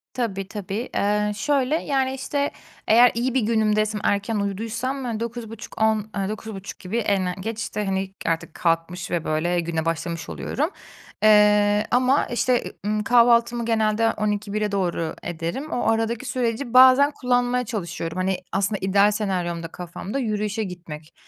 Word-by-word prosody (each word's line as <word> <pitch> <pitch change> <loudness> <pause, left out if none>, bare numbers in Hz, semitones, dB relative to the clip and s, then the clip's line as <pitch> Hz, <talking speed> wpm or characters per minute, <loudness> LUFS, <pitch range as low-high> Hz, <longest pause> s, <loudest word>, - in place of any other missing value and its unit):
Tabii, 195 -6 -2
tabii. 210 +3 -5
Eee, 210 +1 +1
şöyle: 280 +4 +1
Yani, 265 -2 0
işte, 280 +2 -2 0.4
eğer 240 +2 +7
iyi 245 +2 -1
bir 260 - +2
günümdeysem, 215 -1 +1
erken 205 +2 0
uyuduysam 225 +4 -2
9.30-10.00, 220 -2 -2
eee, 195 0 -1
9.30 215 -2 -7
gibi 195 +5 -4
en, 200 -4 +1
eee, 180 - -1
geç, 220 +3 -4
işte, 210 -2 -3
hani, 190 0 -2
artık 165 -1 -1
kalkmış 170 +1 -1
ve, 170 -2 0
böyle, 175 +3 0
güne 165 -1 -2
başlamış 165 0 -3
oluyorum. 305 +5 -2 0.5
Eee, 210 -1 +5
ama, 255 +3 +3
işte, 245 0 +1
eee, - - -7
ımm, 210 0 0
kahvaltımı 235 0 +4
genelde 225 0 +2
12.00-13.00'e 210 0 -2
doğru 175 -4 -1
ederim. 175 - -4
O 245 - 0
aradaki 225 +2 -1
süreci 245 0 -2
bazen 260 +3 +7
kullanmaya 250 -2 0
çalışıyorum. 170 -5 -4
Hani, 185 0 0
aslında 195 +2 0
ideal 200 +2 +4
senaryomda 180 -5 -2
kafamda 180 +8 -6
yürüyüşe 215 -2 -1
gitmek, 170 -4 -9
210 Hz, 145 wpm, -23 LUFS, 190-235 Hz, 0.5 s, eğer